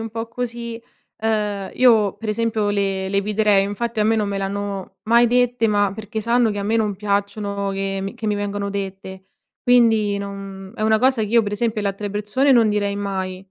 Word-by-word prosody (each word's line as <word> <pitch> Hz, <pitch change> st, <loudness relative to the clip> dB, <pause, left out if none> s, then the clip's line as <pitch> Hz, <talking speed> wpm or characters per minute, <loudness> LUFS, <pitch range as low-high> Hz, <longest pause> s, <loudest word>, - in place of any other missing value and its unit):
un 225 Hz, 0 st, -5 dB
po' 225 Hz, +1 st, -4 dB
così, 235 Hz, -1 st, -5 dB, 0.4 s
uhm, 210 Hz, -3 st, -1 dB
io, 220 Hz, -6 st, +4 dB
per 215 Hz, +2 st, -7 dB
esempio, 215 Hz, -1 st, 0 dB
le 195 Hz, -2 st, -1 dB
le 200 Hz, 0 st, +1 dB
eviterei. 210 Hz, -1 st, +2 dB
Infatti 220 Hz, +3 st, -2 dB
a -, -, +3 dB
me 225 Hz, +1 st, +3 dB
non 210 Hz, -1 st, 0 dB
me 200 Hz, -, -2 dB
le 195 Hz, -, -2 dB
hanno 200 Hz, -1 st, -4 dB
mai 235 Hz, +2 st, +4 dB
dette, 245 Hz, -1 st, +2 dB
ma 205 Hz, -2 st, +2 dB
perché 220 Hz, 0 st, -5 dB
sanno 235 Hz, +1 st, +2 dB
che 205 Hz, -, -4 dB
a 200 Hz, -, -3 dB
me 220 Hz, +3 st, 0 dB
non 210 Hz, -3 st, 0 dB
piacciono 200 Hz, 0 st, -2 dB
che 195 Hz, 0 st, -2 dB
mi 195 Hz, -, -5 dB
che 220 Hz, -, -6 dB
mi 210 Hz, -, +1 dB
vengono 205 Hz, 0 st, -3 dB
dette. 190 Hz, -1 st, -6 dB, 0.4 s
Quindi 225 Hz, -4 st, +3 dB
non 195 Hz, -1 st, -7 dB
è 215 Hz, -, -5 dB
una 220 Hz, 0 st, +3 dB
cosa 255 Hz, -2 st, +2 dB
che 210 Hz, -, -2 dB
io, 230 Hz, +1 st, +4 dB
per 205 Hz, -, -4 dB
esempio, 215 Hz, 0 st, -1 dB
le 200 Hz, -, +1 dB
altre 200 Hz, +1 st, -4 dB
persone 210 Hz, +7 st, +1 dB
non 235 Hz, -4 st, +5 dB
direi 205 Hz, -1 st, 0 dB
mai, 190 Hz, -2 st, -3 dB
210 Hz, 215 wpm, -21 LUFS, 200-225 Hz, 0.4 s, non